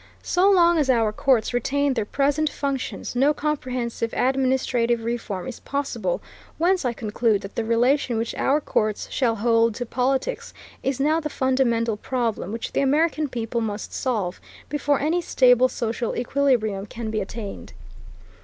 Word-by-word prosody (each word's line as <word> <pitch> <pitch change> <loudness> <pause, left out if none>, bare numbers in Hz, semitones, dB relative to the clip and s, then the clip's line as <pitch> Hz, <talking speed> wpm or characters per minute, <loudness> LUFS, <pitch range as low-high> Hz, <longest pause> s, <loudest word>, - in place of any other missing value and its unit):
So 370 +2 +3
long 345 -3 +5
as 285 -3 +1
our 230 -4 +3
courts 245 -1 +2
retain 280 +3 +1
their 225 - -1
present 290 +4 +1
functions 275 -4 -4
no 280 +4 +3
comprehensive 250 -6 -2
administrative 255 -3 +1
reform 225 -5 -3
is 255 - -7
possible, 285 - -2 0.3
whence 360 +1 +2
I 245 - +2
conclude 220 -2 0
that 195 - -9
the 230 - -2
relation 240 +2 +2
which 225 +1 -2
our 285 +3 +2
courts 215 -7 -1
shall 235 -4 +1
hold 230 0 +2
to 245 - -3
politics 265 - -1 0.3
is 270 0 -1
now 305 +4 +2
the 300 -2 -4
fundamental 235 -5 +1
problem 230 -5 -2
which 230 +1 -4
the - - 0
American 305 +2 +1
people 235 -1 -2
must 210 -2 -4
solve, 210 -9 -2 0.3
before 290 -1 +1
any 325 +5 +1
stable 255 -5 +4
social 230 -1 -2
equilibrium 240 -6 +1
can 225 +1 -5
be 215 -1 -1
attained. 205 +1 -7
250 Hz, 155 wpm, -24 LUFS, 230-280 Hz, 0.3 s, long